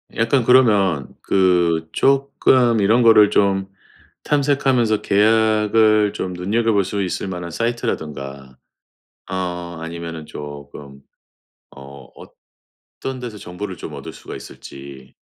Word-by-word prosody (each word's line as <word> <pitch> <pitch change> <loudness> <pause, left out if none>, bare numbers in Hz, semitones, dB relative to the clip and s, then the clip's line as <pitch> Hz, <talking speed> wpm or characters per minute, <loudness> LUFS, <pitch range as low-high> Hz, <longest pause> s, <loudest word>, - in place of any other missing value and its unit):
약간 115 +3 +1
그러면 105 - +3
그 85 -4 +2
쪼끔 130 -4 +2
이런 110 +5 +3
거를 110 -3 +6
좀 95 -1 +1 0.6
탐색하면서 135 -6 +1
계약을 110 0 +3
좀 90 - -4
눈여겨볼 105 +3 0
수 100 +2 -3
있을만한 90 -2 -4
사이트라든가 70 - -4 0.7
어 90 -2 -4
아니면은 85 -1 -7
조금 70 -1 -10 0.7
어 70 +1 -13 0.7
어떤 130 -1 -8
데서 120 -4 -7
정보를 95 +1 -7
좀 75 - -8
얻을 70 - -8
수가 - - -10
있을지. 70 -1 -12
95 Hz, 235 characters per minute, -20 LUFS, 80-115 Hz, 0.7 s, 거를